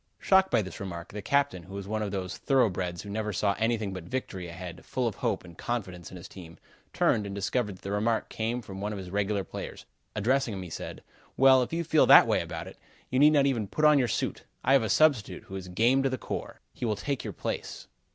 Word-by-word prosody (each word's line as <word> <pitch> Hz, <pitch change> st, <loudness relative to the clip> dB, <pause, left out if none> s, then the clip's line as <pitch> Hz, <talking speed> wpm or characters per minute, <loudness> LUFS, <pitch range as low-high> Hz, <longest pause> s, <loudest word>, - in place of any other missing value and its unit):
Shocked 190 Hz, 0 st, +4 dB
by 110 Hz, -, +2 dB
this 95 Hz, -, -8 dB
remark, 85 Hz, -4 st, -6 dB
the 105 Hz, -, -6 dB
captain, 140 Hz, -5 st, +1 dB
who 95 Hz, +4 st, -11 dB
was 100 Hz, -1 st, -6 dB
one 110 Hz, +1 st, -2 dB
of 105 Hz, -, -1 dB
those 95 Hz, -2 st, -4 dB
thoroughbreds 95 Hz, -10 st, +1 dB
who 100 Hz, -, -9 dB
never 105 Hz, 0 st, -2 dB
saw 100 Hz, +1 st, +1 dB
anything 110 Hz, -3 st, 0 dB
but 95 Hz, -3 st, -7 dB
victory 95 Hz, -5 st, -4 dB
ahead, 90 Hz, 0 st, -8 dB
full 125 Hz, -2 st, -1 dB
of 110 Hz, -, -1 dB
hope -, -, -1 dB
and 85 Hz, -2 st, -13 dB
confidence 90 Hz, -6 st, -4 dB
in 95 Hz, -, -9 dB
his 90 Hz, +3 st, -10 dB
team, 85 Hz, -5 st, -12 dB, 0.3 s
turned 105 Hz, -2 st, +2 dB
and 100 Hz, -, -5 dB
discovered 100 Hz, +1 st, -1 dB
that -, -, -19 dB
the 100 Hz, -, -4 dB
remark 110 Hz, +3 st, 0 dB
came 115 Hz, +2 st, -3 dB
from 95 Hz, -1 st, -8 dB
one 105 Hz, +1 st, -2 dB
of -, -, -5 dB
his 95 Hz, -2 st, -7 dB
regular 100 Hz, 0 st, 0 dB
players. -, -, -8 dB, 0.3 s
Addressing 120 Hz, +1 st, +1 dB
him, 95 Hz, -, -5 dB
he 90 Hz, -, -9 dB
said: -, -, -7 dB, 0.3 s
"Well! 130 Hz, 0 st, +7 dB
If 125 Hz, -, -2 dB
you 170 Hz, +1 st, -1 dB
feel 160 Hz, -1 st, +4 dB
that -, -, +10 dB
way -, -, +2 dB
about -, -, -6 dB
it, -, -, -12 dB, 0.3 s
you 130 Hz, -, +2 dB
need 150 Hz, +2 st, +7 dB
not 140 Hz, -2 st, +4 dB
even 120 Hz, -7 st, 0 dB
put 150 Hz, +10 st, 0 dB
on 150 Hz, -1 st, +7 dB
your 125 Hz, -, +2 dB
suit. -, -, -2 dB, 0.2 s
I 135 Hz, -, +4 dB
have 135 Hz, -, +6 dB
a 110 Hz, -, -2 dB
substitute, 140 Hz, -3 st, +3 dB
who 95 Hz, -, -9 dB
is 95 Hz, -1 st, -6 dB
game 115 Hz, +9 st, +3 dB
to 135 Hz, -, +1 dB
the 130 Hz, -, -2 dB
core. -, -, -6 dB
He -, -, -9 dB
will 110 Hz, -3 st, +1 dB
take 140 Hz, +7 st, -3 dB
your -, -, -5 dB
place." -, -, -5 dB
105 Hz, 250 wpm, -28 LUFS, 95-130 Hz, 0.3 s, that